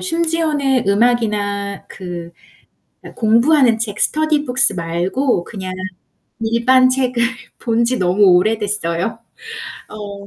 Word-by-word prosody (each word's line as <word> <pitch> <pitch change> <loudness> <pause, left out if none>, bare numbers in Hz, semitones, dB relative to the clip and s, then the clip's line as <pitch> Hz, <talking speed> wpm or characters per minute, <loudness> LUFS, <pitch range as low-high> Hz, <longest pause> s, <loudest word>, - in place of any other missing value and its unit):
심지어는 320 - 0
음악이나 205 -2 0
그 175 -2 -8 0.9
공부 235 +7 +3
하는 250 -7 +4
책, 215 -2 -2
스터디 310 -1 +1
북스 250 -4 +3
말고 175 +7 -1
그냥 190 -4 -7 0.7
일반 235 +3 +3
책을 255 -2 0 0.4
본 235 -1 0
지 250 +2 0
너무 185 +3 +2
오래됐어요. 205 0 -1 0.7
어 200 -1 -9
225 Hz, 215 characters per minute, -18 LUFS, 200-255 Hz, 0.9 s, 하는